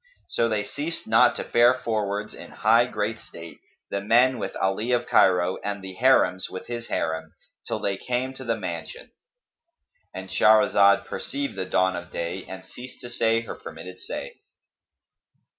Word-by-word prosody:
So 115 - +1
they 105 -2 0
ceased 150 +9 -5
not 115 +3 +4
to - - -3
fare 120 +2 +4
forwards 105 -4 -2
in - - -10
high 115 +3 +3
great 105 -1 -3
state, 85 0 -11 0.3
the 100 - -1
men 120 +5 +3
with - - -4
Ali 100 +5 -1
of 120 0 +1
Cairo 90 -1 +3
and 100 -1 -4
the 95 -1 -7
Harims 95 -5 +3
with 95 - -7
his 120 -1 -6
Harim, 80 0 -3 0.3
till - - -2
they 100 -1 -2
came 125 +4 -2
to 130 - -9
the 115 -2 -1
mansion,—And - - -10
Shahrazad 100 -2 +5
perceived 140 -4 -4
the 95 -1 -3
dawn 95 0 +1
of 90 0 -7
day 85 +3 -4
and 95 0 -9
ceased 125 +6 -11
to 120 -1 -8
say 115 -1 +2
her 115 - -7
permitted 85 +3 -10
say. - - -6
110 Hz, 160 wpm, -25 LUFS, 95-125 Hz, 0.3 s, Shahrazad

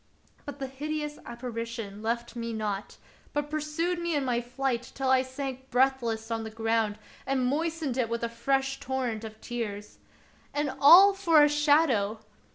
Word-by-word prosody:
But 285 - -6
the 275 - -4
hideous 295 +2 -4
apparition 230 -3 -6
left 235 +2 -2
me 230 -1 -4
not, 210 -2 -4 0.4
but 295 0 -2
pur 310 - 0
sued 330 +4 -1
me 340 -2 -1
in 285 -2 0
my 240 -2 0
flight 250 0 -3
till 265 -1 0
I 260 -1 +5
sank 265 0 -6
breathless 240 -3 +1
on 225 0 -1
the 220 - -5
ground 225 -1 0 0.3
and 265 -1 +1
moistened 305 -1 -1
it 235 -3 +1
with 235 0 -2
a - - +1
fresh 270 +3 -1
torrent 250 -4 -2
of 220 0 -9
tears. 210 -4 -5 0.6
And 290 -1 0
all 370 +8 +9
for 335 -6 +5
a - - +6
shadow 290 -8 +3
260 Hz, 165 wpm, -28 LUFS, 230-290 Hz, 0.6 s, all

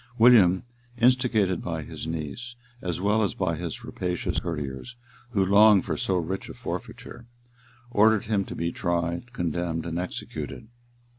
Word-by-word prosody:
William, 110 -7 +6 0.3
instigated 115 -7 +3
by 80 -2 -3
his 80 - -7
niece, 80 +10 -5 0.3
as 90 -2 -3
well 105 +3 +2
as 100 - 0
by 85 -3 0
his 85 -1 -6
rapacious 90 -1 -2
courtiers, 75 - -5 0.3
who 100 -5 +1
longed 100 0 +6
for 80 - -1
so 95 +5 0
rich 90 +3 -3
a - - -8
forfeiture, 120 - -7 0.6
ordered 110 -1 +4
him 105 -2 +1
to - - -8
be 85 0 -1
tried, 85 +6 -2
condemned, 85 -4 -2
and 85 0 -3
executed. 90 +4 -6
90 Hz, 145 wpm, -26 LUFS, 85-110 Hz, 0.6 s, William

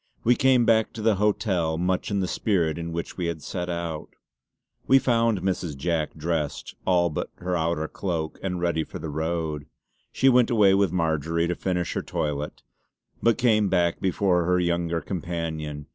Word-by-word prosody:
We 120 - +5
came 130 -1 +4
back 110 -1 +3
to 110 - -6
the 110 -3 +3
hotel 95 -6 +1
much 90 +2 0
in 100 -2 0
the 95 - -1
spirit 85 -6 0
in 85 0 -4
which 85 0 -5
we 90 -2 -1
had 85 -2 -4
set 90 -1 -4
out. 85 -2 -4 0.8
We 135 - +7
found 115 -6 +2
Mrs. 90 -6 -2
Jack 80 +1 -1
dressed, 80 -2 -3
all 85 -2 +3
but - - -3
her 90 0 -3
outer 80 -2 0
cloak, 80 -5 -3
and 90 -2 -2
ready 85 -2 0
for - - -8
the 80 - -6
road. 80 -1 -2 0.4
She 135 - +2
went 125 -1 +5
away 105 -5 +5
with 100 -3 +3
Marjory 80 -1 0
to 85 - 0
finish 90 -1 -2
her - - -1
toilet, 75 0 -3 0.6
but 115 -1 +3
came 110 -5 +3
back 85 -2 +1
before 90 -2 +1
her 90 +1 +2
younger 85 -1 0
companion. 80 -4 -4
85 Hz, 175 wpm, -25 LUFS, 80-95 Hz, 0.8 s, We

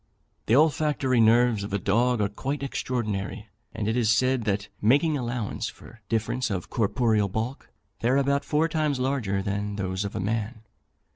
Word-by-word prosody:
The 115 - +4
olfactory 145 -3 +2
nerves 115 -1 +4
of 100 - -6
a - - +2
dog 115 +5 +1
are 100 - +2
quite 135 +8 -4
extraordinary, 110 -5 -3 0.2
and 110 -2 -3
it 110 - 0
is 120 -3 +2
said 130 0 +2
that, 100 -1 -1
making 145 +8 +3
allowance 120 -5 -3
for 115 - -15
difference 115 +2 -1
of 95 -4 -4
corporeal 110 -2 +1
bulk, 115 +7 -4 0.3
they 115 - +1
are 130 - +3
about 140 0 +1
four 155 +2 +1
times 155 -4 0
larger 125 -8 -1
than 100 +1 -2
those 95 -1 -2
of 100 - -5
a - - -2
man. 110 +3 -3
115 Hz, 170 wpm, -26 LUFS, 105-130 Hz, 0.3 s, The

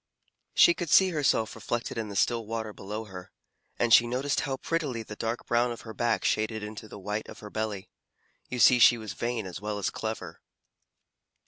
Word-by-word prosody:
She 175 - +7
could 170 -2 -5
see 190 +4 +6
herself 140 -8 +1
reflected 120 0 -3
in 110 -2 -3
the 100 - -7
still 115 +3 +1
water 110 -1 -4
below 105 +3 -6
her, 90 -3 -10 0.5
and 120 -1 +2
she 120 - +7
noticed 130 +4 0
how 135 -3 -2
prettily 140 -6 -2
the 105 - -9
dark 115 +2 -3
brown 120 +1 +2
of 120 - -7
her 110 - -9
back 115 +2 0
shaded 110 0 0
into 105 +1 -7
the 105 - -10
white 105 +2 -4
of - - -10
her 105 -1 -9
belly. 110 -3 -3 0.6
You 125 - -4
see 125 +1 +6
she 120 +1 +7
was 110 -2 -6
vain 120 -3 -3
as 90 0 -7
well 105 0 -3
as 100 - -1
clever. 110 -1 -5
115 Hz, 200 wpm, -28 LUFS, 105-120 Hz, 0.6 s, She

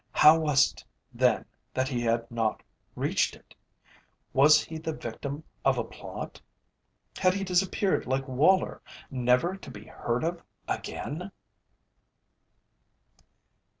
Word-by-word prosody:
How 155 +2 +7
was 150 -4 +4
it, - - -14 0.3
then, - - +2 0.3
that 130 0 +1
he 125 -3 -2
had 115 0 0
not 115 -2 -1 0.3
reached - - +1
it? - - -20 0.8
Was 150 +3 +6
he 160 0 -7
the 160 0 -3
victim 140 +4 -6 0.2
of 135 -2 +3
a 120 - 0
plot? 115 - -8 0.8
Had 185 0 +3
he 195 - -2
disappeared 190 - +1
like 130 +1 -1
Woller, 150 +9 +3 0.3
never 125 +7 +2
to 195 - -11
be 105 -4 -10
heard 120 +3 -2
of 170 +1 -2 0.3
again? - - -4
140 Hz, 120 wpm, -28 LUFS, 125-165 Hz, 0.8 s, How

